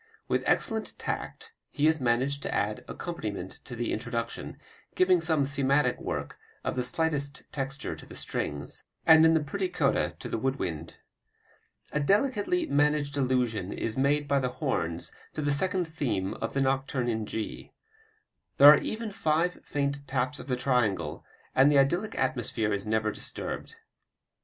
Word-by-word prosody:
With - - +1
excellent 220 -1 0
tact 450 +1 -5 0.2
he 150 - 0
has 160 -2 +3
managed 130 +4 +1
the - - -3
added 105 +1 -1
accompaniment 105 - -5
to 125 - -7
the 120 0 -2
introduction, 115 +1 -4 0.4
giving 185 -2 +4
some 160 -4 +2
thematic 140 +1 +1
work - - -4 0.2
of - - -2
the 125 - 0
slightest 145 +1 -1
texture 135 -1 -4
to - - -13
the - - -11
strings, 70 0 -3 0.2
and 160 0 +8
in 165 - +5
the 160 - +2
pretty 185 +7 -2
coda 180 - +1
to - - -7
the - - -2
wood 135 +3 0
wind. 85 - -4 1.0
A 150 - 0
delicately 235 - +2
managed 145 - +1
allusion 125 -7 0
is 110 - -3
made 145 +2 +2
by 140 0 +3
the 130 -1 0
horns 85 - -2 0.2
to 155 - -3
the 145 - +1
second 180 +5 +1
theme 115 -12 -2
of - - -4
the 135 - +2
nocturne 135 -1 0
in 110 -2 -1
G. 110 -1 -5 0.9
There 145 +1 +11
are - - +6
even 220 0 -4
five 165 -1 0
faint 140 0 -2
taps 130 +2 -1
of - - -9
the 125 - +1
triangle, 125 - 0 0.3
and 135 +2 +6
the 145 - +4
idyllic 175 +10 +2
atmosphere 115 -6 0
is 100 +1 -2
never 110 0 +1
disturbed. - - -6
140 Hz, 160 wpm, -28 LUFS, 120-155 Hz, 1.0 s, There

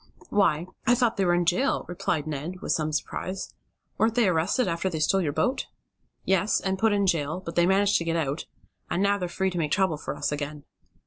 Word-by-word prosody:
"Why, 175 -5 +2 0.2
I 245 - +6
thought 235 -2 +1
they 195 - +2
were 175 0 +3
in 175 0 +1
jail," 185 +11 +1
replied 165 -3 -2
Ned, 155 +4 -4
in - - -7
some 155 -1 +1
surprise. 185 +5 -4 0.5
"Weren't 225 +1 +2
they 240 -4 +4
arrested 180 +8 +1
after 170 +2 -1
they 165 - -4
stole 190 +5 +2
your 155 -5 0
boat?" 255 - 0 0.6
"Yes, 190 +2 +2
and 190 0 -2
put 225 +1 +3
in 200 -1 +2
jail, 160 -2 0
but 165 -3 -7
they 175 +1 +3
managed 200 +1 +4
to - - -3
get 165 0 -1
out, 150 -2 -2 0.4
and 185 - 0
now 200 0 +2
they're 180 -2 -3
free 190 +2 -1
to 175 - -3
make 150 -2 -1
trouble 190 -6 +2
for - - -5
us - - -2
again." 145 0 -4
180 Hz, 220 wpm, -26 LUFS, 160-200 Hz, 0.6 s, I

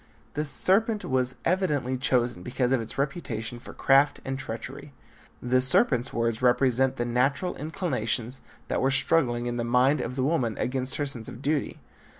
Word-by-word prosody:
The 150 +1 -2
serpent 210 +8 +2
was 130 -1 0
evidently 150 -8 0
chosen 125 -4 0
because 125 +5 -1
of 130 -3 +2
its 115 - -8
reputation 120 -5 -3
for - - -11
craft 140 +2 +3
and 135 0 -3
treachery. 130 +3 -7 0.5
The 125 +1 +2
serpent's 130 - +3
words 115 0 -1
represent 130 +1 +3
the 120 - -2
natural 135 +8 0
inclinations 130 - -2 0.3
that - - -1
were 135 - +2
struggling 130 -3 +2
in 120 0 -2
the 120 - -1
mind 125 +5 +3
of 125 - -4
the 130 - -1
woman 130 -7 0
against 130 +1 -1
her 145 - -1
sense 125 -5 -5
of 125 - -10
duty. 150 0 -1
130 Hz, 165 wpm, -26 LUFS, 120-140 Hz, 0.5 s, craft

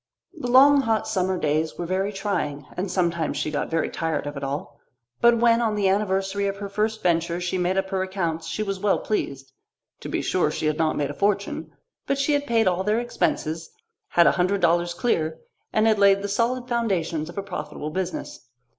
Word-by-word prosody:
The 245 - -5
long 275 +3 +7
hot 225 -4 0
summer 190 -3 0
days 155 0 0
were 175 - -3
very 190 +3 -1
trying, 185 -8 -2
and 185 +2 -2
sometimes 170 -3 0
she 155 - -2
got 145 - -2
very 165 0 0
tired 165 -2 -2
of 145 0 -5
it 140 - -6
all. 140 +2 -5 0.4
But 235 0 +6
when 230 0 +4
on 220 -2 +1
the 205 -2 +1
anniversary 195 0 0
of 195 0 -3
her 200 0 -6
first 215 +2 -1
venture 170 0 +1
she 180 +1 -2
made 180 +2 0
up 190 0 -1
her 190 -1 0
accounts 170 -4 -2
she 170 +6 -2
was 195 -2 -3
well 205 +1 +2
pleased. 135 -10 -3 0.5
To - - -7
be - - -1
sure, - - +1
she - - -3
had 155 0 0
not 160 -1 +1
made 145 -1 -1
a - - -7
fortune; 200 +4 -1 0.3
but 275 - +1
she 280 +2 +1
had 285 0 0
paid 225 -4 +3
all 185 0 +1
their 210 +3 +1
expenses, 165 -8 -2 0.4
had 170 - +4
a - - +6
hundred 185 +2 +1
dollars 175 0 +2
clear, 160 -8 0 0.3
and 215 0 +2
had 220 -2 +3
laid 200 0 +5
the - - -1
solid 240 +4 0
foundations 185 -10 -1
of 175 - -11
a 200 - -2
profitable 150 -5 -6
business. 180 -7 -5
190 Hz, 210 wpm, -24 LUFS, 165-210 Hz, 0.5 s, long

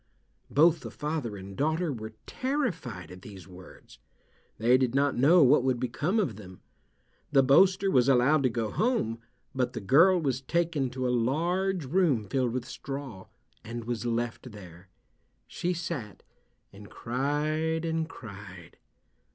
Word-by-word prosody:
Both 165 +3 +4
the - - -8
father 150 -8 -4
and 95 0 -10
daughter 155 - 0
were 110 -2 -8
terrified 185 - -3
at 90 0 -11
these 95 -2 -12
words. 90 -8 -15 0.6
They 120 +3 +4
did 130 -1 +1
not 140 0 +2
know 155 +6 +5
what 135 0 +5
would 130 -2 0
become 145 - -1
of 130 - -1
them. 95 -3 -12 0.7
The 135 -2 +5
boaster 190 +8 +4
was 125 -3 +3
allowed 135 +4 +4
to 130 - +2
go 115 -2 -3
home, 215 - 0 0.3
but 125 -2 -1
the 115 - -4
girl 165 - +5
was 135 -5 -1
taken 165 -2 -1
to 130 0 -3
a 125 - 0
large 170 +8 0
room 140 - +1
filled 130 +1 0
with 125 0 -3
straw, 135 -8 -7 0.4
and 115 +1 -6
was 115 0 -4
left 120 +1 -3
there. 90 -2 -13 0.6
She 175 - -3
sat 165 - -5 0.5
and 100 +1 -13
cried 155 +6 -2
and 160 0 -2
cried. 95 - -11
130 Hz, 150 wpm, -28 LUFS, 115-160 Hz, 0.7 s, know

